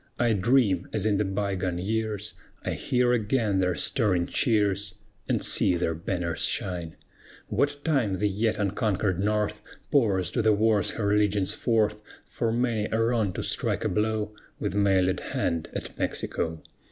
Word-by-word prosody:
I 120 Hz, -2 st, +2 dB
dream, 100 Hz, -3 st, +2 dB
as 110 Hz, -2 st, 0 dB
in 105 Hz, -2 st, +2 dB
the 105 Hz, -, +2 dB
by 100 Hz, 0 st, -1 dB
gone 90 Hz, -2 st, -2 dB
years, 105 Hz, +2 st, -2 dB, 0.3 s
I -, -, -1 dB
hear 125 Hz, -1 st, +1 dB
again 110 Hz, -3 st, +1 dB
their 90 Hz, -1 st, +1 dB
stirring 95 Hz, -9 st, +1 dB
cheers, 100 Hz, -2 st, 0 dB, 0.3 s
And -, -, +1 dB
see 90 Hz, -, +4 dB
their 85 Hz, -1 st, 0 dB
banners 85 Hz, 0 st, -3 dB
shine, 85 Hz, -4 st, -1 dB, 0.5 s
What 145 Hz, 0 st, -1 dB
time 130 Hz, -11 st, +1 dB
the 105 Hz, +3 st, +1 dB
yet 110 Hz, +2 st, 0 dB
unconquered 100 Hz, -2 st, 0 dB
North 105 Hz, +1 st, 0 dB, 0.3 s
Pours 100 Hz, -10 st, +2 dB
to 120 Hz, -, 0 dB
the 110 Hz, -1 st, +4 dB
wars 105 Hz, -1 st, +2 dB
her 105 Hz, -2 st, +1 dB
legions 105 Hz, -2 st, +2 dB
forth, 105 Hz, -3 st, +1 dB, 0.2 s
For 115 Hz, -1 st, -2 dB
many 115 Hz, -3 st, 0 dB
a 110 Hz, -, +1 dB
wrong 115 Hz, -3 st, +1 dB
to -, -, -4 dB
strike -, -, -1 dB
a -, -, +2 dB
blow 110 Hz, 0 st, -1 dB, 0.3 s
With -, -, -2 dB
mailèd 95 Hz, -2 st, +2 dB
hand 85 Hz, -1 st, -2 dB
at -, -, -5 dB
Mexico. 80 Hz, -1 st, -2 dB
105 Hz, 160 wpm, -27 LUFS, 95-110 Hz, 0.5 s, see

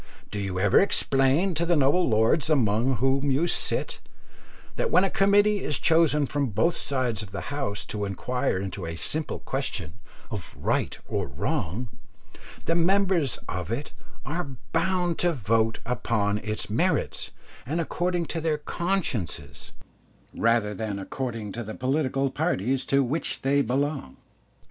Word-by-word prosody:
Do 105 Hz, -, -3 dB
you 95 Hz, -2 st, -2 dB
ever 100 Hz, -, +5 dB
explain 145 Hz, 0 st, +2 dB
to 165 Hz, +1 st, 0 dB
the 170 Hz, 0 st, +2 dB
noble 145 Hz, +4 st, +3 dB
lords 115 Hz, +8 st, +3 dB
among 125 Hz, -2 st, +2 dB
whom 135 Hz, +3 st, +1 dB
you 140 Hz, +5 st, +2 dB
sit, 175 Hz, -, +2 dB, 0.8 s
that -, -, 0 dB
when 185 Hz, -, +5 dB
a 195 Hz, -, +1 dB
committee 205 Hz, +1 st, +3 dB
is 150 Hz, -, +1 dB
chosen 160 Hz, -3 st, +3 dB
from 140 Hz, 0 st, -1 dB
both 115 Hz, -, +1 dB
sides 130 Hz, -6 st, -1 dB
of 105 Hz, -, -8 dB
the 100 Hz, +8 st, -6 dB
House 135 Hz, -8 st, -2 dB
to 105 Hz, -1 st, -3 dB
inquire 115 Hz, +3 st, -1 dB
into 95 Hz, -2 st, -4 dB
a 80 Hz, -, -4 dB
simple 155 Hz, -, -1 dB
question 110 Hz, -, -3 dB, 0.3 s
of 105 Hz, -6 st, -3 dB
right -, -, 0 dB
or -, -, -2 dB
wrong, 90 Hz, -, -2 dB, 0.8 s
the 165 Hz, -, +2 dB
members 175 Hz, -, +2 dB
of 90 Hz, +2 st, -4 dB
it 135 Hz, +6 st, -3 dB, 0.3 s
are 145 Hz, -3 st, -4 dB, 0.2 s
bound 175 Hz, 0 st, +1 dB
to 175 Hz, -1 st, +2 dB
vote 115 Hz, -3 st, +1 dB
upon 110 Hz, -4 st, 0 dB
its 110 Hz, 0 st, -3 dB
merits 160 Hz, -, 0 dB, 0.3 s
and 155 Hz, +6 st, -2 dB
according 175 Hz, +1 st, -1 dB
to 165 Hz, +1 st, -4 dB
their 155 Hz, -1 st, +1 dB
consciences, 170 Hz, -, -3 dB, 0.6 s
rather 115 Hz, -2 st, +2 dB
than 105 Hz, -1 st, -3 dB
according 115 Hz, +1 st, -4 dB
to 120 Hz, +4 st, -5 dB
the 110 Hz, 0 st, -7 dB
political 135 Hz, 0 st, 0 dB
parties 135 Hz, -, 0 dB
to 140 Hz, 0 st, +3 dB
which 130 Hz, -1 st, -3 dB
they 140 Hz, +1 st, +3 dB
belong? 135 Hz, -, -1 dB
135 Hz, 150 wpm, -26 LUFS, 110-165 Hz, 0.8 s, ever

